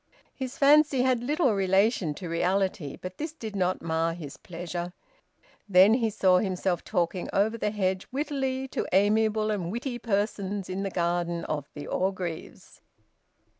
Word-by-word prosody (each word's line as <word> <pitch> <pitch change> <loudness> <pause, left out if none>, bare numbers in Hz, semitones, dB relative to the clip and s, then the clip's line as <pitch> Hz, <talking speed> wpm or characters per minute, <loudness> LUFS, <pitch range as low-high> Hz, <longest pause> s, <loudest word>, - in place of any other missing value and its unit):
His 260 0 -6
fancy 285 -2 +5
had 255 -2 +2
little 280 -1 +2
relation 195 -3 +2
to 180 - -7
reality. 180 -2 0
But 185 0 -8
this 310 +1 -4
did 220 -9 -7
not 185 -1 0
mar 165 0 0
his 150 -5 -8
pleasure... 175 0 -6 0.8
Then 190 +3 +7
he 230 -2 +2
saw 185 -3 +3
himself 185 -3 -1
talking 180 -2 -1
over 215 +3 +2
the 215 - -1
hedge, 190 -3 -1
wittily, 265 -2 -2
to - - -2
amiable 215 +2 +3
and 180 -5 -2
witty 240 +2 -4
persons 200 -3 -2
in 190 +1 -3
the 195 - -2
garden 175 -1 -1
of 145 -2 -3
the 145 - -6
Orgreaves. 185 -3 -4
195 Hz, 150 wpm, -27 LUFS, 175-230 Hz, 0.8 s, Then